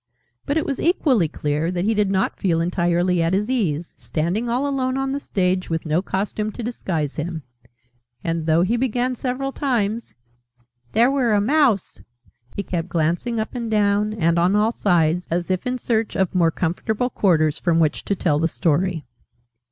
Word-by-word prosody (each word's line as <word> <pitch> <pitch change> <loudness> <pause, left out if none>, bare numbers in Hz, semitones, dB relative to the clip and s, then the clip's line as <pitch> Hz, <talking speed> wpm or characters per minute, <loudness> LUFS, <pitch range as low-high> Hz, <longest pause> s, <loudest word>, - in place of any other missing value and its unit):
But 285 +2 +1
it 320 - 0
was 275 - -3
equally 275 - +2
clear 150 +1 -2
that 180 0 -1
he 225 - +2
did 210 -2 +1
not 190 0 0
feel 170 -4 +1
entirely 175 +1 +1
at 165 +3 +1
his 210 +5 -1
ease, 175 - -1
standing 180 +9 -2
all 255 +4 0
alone 260 -2 -1
on 270 0 -1
the 280 - -2
stage, 185 -7 -1
with 165 0 -2
no 160 +3 +1
costume 210 +2 -2
to 240 - -6
disguise 170 - -3
him: 160 0 -4 0.8
and 165 -1 -2
though 165 +2 +4
he 225 +6 +1
began, 250 +1 0
several 260 +2 -3
times, 230 - -1 0.8
"There 240 +4 +4
were 255 -5 +2
a 205 - +4
Mouse 240 - +1 0.3
," 120 +1 -31
he 200 - -2
kept 175 -2 -3
glancing 175 +8 0
up 220 - -3
and 235 -3 -4
down, 210 0 +2
and 170 -4 +2
on 180 +4 +3
all 215 +2 +3
sides, 175 -5 +1
as 175 +2 -1
if 185 +5 -1
in 250 0 -1
search 225 -3 -1
of 190 -2 0
more 175 -3 +3
comfortable 210 +9 -1
quarters 160 -7 +2
from 170 -2 +2
which 155 -2 +1
to 200 - 0
tell 155 -5 +1
the 165 - +2
Story. 165 0 0
190 Hz, 185 wpm, -22 LUFS, 170-235 Hz, 0.8 s, though